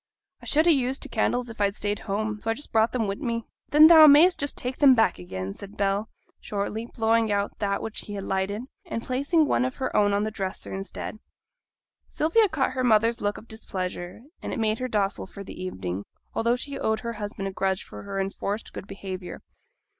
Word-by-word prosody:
I -, -, -12 dB
should 310 Hz, +6 st, +4 dB
ha' 345 Hz, -, +6 dB
used 265 Hz, -1 st, -1 dB
t' -, -, -4 dB
candles 245 Hz, -1 st, 0 dB
if 220 Hz, -, -8 dB
I'd 200 Hz, 0 st, +2 dB
stayed 205 Hz, 0 st, -2 dB
at -, -, -14 dB
home, 210 Hz, +1 st, -2 dB
so 225 Hz, -, -3 dB
I 225 Hz, -, +1 dB
just 290 Hz, -, -7 dB
brought 225 Hz, 0 st, +3 dB
them 245 Hz, -3 st, 0 dB
wi' 200 Hz, 0 st, -2 dB
me.' 230 Hz, -2 st, -3 dB, 0.2 s
'Then 300 Hz, +1 st, +8 dB
thou 315 Hz, -1 st, +10 dB
may'st 320 Hz, +5 st, +7 dB
just 285 Hz, -1 st, -2 dB
take 250 Hz, +1 st, -3 dB
them 275 Hz, -3 st, +7 dB
back 225 Hz, -, +2 dB
again,' 95 Hz, +2 st, -5 dB
said 200 Hz, -, -11 dB
Bell, 200 Hz, +2 st, 0 dB, 0.3 s
shortly, 210 Hz, +2 st, -3 dB
blowing 225 Hz, -1 st, +1 dB
out 200 Hz, 0 st, -1 dB
that 200 Hz, -1 st, -1 dB
which 225 Hz, -, -4 dB
he 205 Hz, -, -5 dB
had 195 Hz, -, -4 dB
lighted, 195 Hz, +4 st, -2 dB, 0.2 s
and 275 Hz, -, -5 dB
placing 280 Hz, +5 st, +2 dB
one 270 Hz, -, +2 dB
of 255 Hz, 0 st, -2 dB
her 260 Hz, -, -3 dB
own 205 Hz, -1 st, +4 dB
on 200 Hz, +1 st, +1 dB
the 215 Hz, -, -2 dB
dresser 195 Hz, -3 st, -5 dB
instead. 195 Hz, +2 st, -6 dB, 0.9 s
Sylvia 390 Hz, +8 st, +3 dB
caught 300 Hz, -6 st, 0 dB
her 255 Hz, 0 st, -2 dB
mother's 230 Hz, 0 st, +3 dB
look 205 Hz, 0 st, -1 dB
of 225 Hz, -, -12 dB
displeasure, 185 Hz, -3 st, -5 dB, 0.2 s
and -, -, -5 dB
it -, -, -3 dB
made 220 Hz, 0 st, +1 dB
her 255 Hz, -, -2 dB
docile 205 Hz, -5 st, -1 dB
for 200 Hz, -, -9 dB
the 185 Hz, -, -9 dB
evening, 95 Hz, -, -4 dB, 0.3 s
although 235 Hz, +1 st, +2 dB
she 275 Hz, +2 st, -5 dB
owed 220 Hz, 0 st, 0 dB
her 235 Hz, -1 st, -4 dB
cousin 205 Hz, -2 st, -5 dB
a 195 Hz, -, -2 dB
grudge 190 Hz, 0 st, -1 dB
for -, -, -10 dB
her 200 Hz, -1 st, -4 dB
enforced 200 Hz, +2 st, -3 dB
good 195 Hz, -, -8 dB
behaviour. 185 Hz, -2 st, -7 dB
220 Hz, 220 wpm, -26 LUFS, 200-250 Hz, 0.9 s, thou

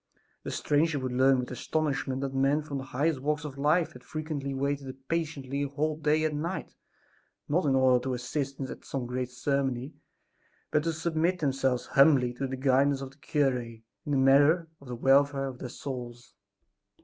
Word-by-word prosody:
The -, -, -6 dB
stranger 150 Hz, +1 st, +1 dB
would 130 Hz, -2 st, -3 dB
learn 130 Hz, +1 st, +4 dB
with 125 Hz, 0 st, -3 dB
astonishment 135 Hz, -1 st, -1 dB
that 135 Hz, -1 st, -3 dB
men 135 Hz, +3 st, +2 dB
from 140 Hz, -2 st, -4 dB
the 135 Hz, -, -7 dB
highest 140 Hz, +3 st, 0 dB
walks 150 Hz, +2 st, -1 dB
of 140 Hz, -2 st, -7 dB
life 155 Hz, +4 st, +2 dB
had 125 Hz, -, -13 dB
frequently 150 Hz, 0 st, -4 dB
waited 135 Hz, -1 st, -3 dB
patiently 145 Hz, -5 st, -2 dB
a 145 Hz, -, 0 dB
whole 150 Hz, +3 st, -1 dB
day 155 Hz, 0 st, +1 dB
and 150 Hz, -1 st, -1 dB
night, 170 Hz, +4 st, -4 dB, 0.7 s
not 160 Hz, +3 st, +1 dB
in 135 Hz, -, +3 dB
order 130 Hz, -2 st, +4 dB
to 130 Hz, -1 st, -1 dB
assist 135 Hz, +3 st, -3 dB
at 130 Hz, -, -6 dB
some 135 Hz, -3 st, -4 dB
great 125 Hz, 0 st, -3 dB
ceremony, 135 Hz, +1 st, -1 dB, 0.8 s
but 150 Hz, -, +3 dB
to 165 Hz, -, 0 dB
submit 165 Hz, +2 st, 0 dB
themselves 135 Hz, -5 st, 0 dB
humbly 135 Hz, -3 st, +4 dB
to 135 Hz, +2 st, -3 dB
the 135 Hz, 0 st, -4 dB
guidance 135 Hz, +1 st, +3 dB
of 135 Hz, -1 st, -6 dB
the 135 Hz, -, -22 dB
cure 145 Hz, -3 st, +1 dB
in 115 Hz, -1 st, -11 dB, 0.2 s
the 145 Hz, -2 st, +1 dB
matter 145 Hz, +5 st, +5 dB
of 140 Hz, -, -15 dB
the 125 Hz, -, -5 dB
welfare 135 Hz, +2 st, +3 dB
of 130 Hz, -2 st, -6 dB
their 125 Hz, -, -6 dB
souls. 120 Hz, -2 st, -7 dB
140 Hz, 185 wpm, -29 LUFS, 130-150 Hz, 0.8 s, matter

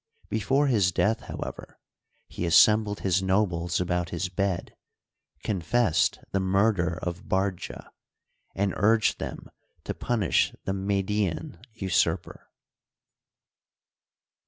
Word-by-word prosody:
Before 135 Hz, +7 st, +1 dB
his 105 Hz, -9 st, +3 dB
death, 110 Hz, +5 st, +1 dB
however, -, -, -8 dB, 0.5 s
he 85 Hz, -, -4 dB
assembled 105 Hz, +5 st, +5 dB
his 95 Hz, -1 st, +1 dB
nobles 95 Hz, -3 st, 0 dB
about 90 Hz, -1 st, -1 dB
his 90 Hz, +1 st, -3 dB
bed, 95 Hz, -1 st, -2 dB, 0.7 s
confessed 105 Hz, +1 st, +1 dB
the 95 Hz, -, +1 dB
murder 95 Hz, -2 st, +1 dB
of 90 Hz, +2 st, -5 dB
Bardja, 95 Hz, -1 st, -2 dB, 0.7 s
and 100 Hz, -1 st, 0 dB
urged 110 Hz, +1 st, +3 dB
them -, -, -7 dB, 0.3 s
to -, -, -3 dB
punish 110 Hz, -7 st, +1 dB
the 95 Hz, -, -2 dB
Median 95 Hz, -4 st, -2 dB
usurper. 95 Hz, -6 st, -1 dB
95 Hz, 100 wpm, -27 LUFS, 90-105 Hz, 0.7 s, assembled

